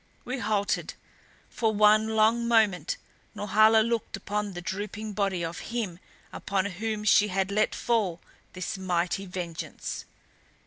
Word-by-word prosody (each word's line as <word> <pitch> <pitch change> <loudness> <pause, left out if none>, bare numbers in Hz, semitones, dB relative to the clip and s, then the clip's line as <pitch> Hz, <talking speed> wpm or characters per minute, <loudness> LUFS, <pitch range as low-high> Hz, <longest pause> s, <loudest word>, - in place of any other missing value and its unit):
We 255 +2 -3
halted. 210 -2 -1 0.5
For 225 -2 0
one 215 +1 +4
long 225 +2 +3
moment 225 - +2 0.4
Norhala 215 +2 +5
looked 230 -4 -2
upon 205 +1 -3
the 175 - -5
drooping 205 +4 -5
body 195 -4 0
of 165 +1 -5
him 215 -8 -3 0.3
upon 195 -1 -1
whom 210 +2 -3
she 210 0 +5
had 190 0 -1
let 215 +2 +1
fall 210 -8 0 0.3
this 185 +1 -4
mighty 180 +1 -1
vengeance. 175 -3 -5
205 Hz, 130 wpm, -27 LUFS, 190-220 Hz, 0.5 s, Norhala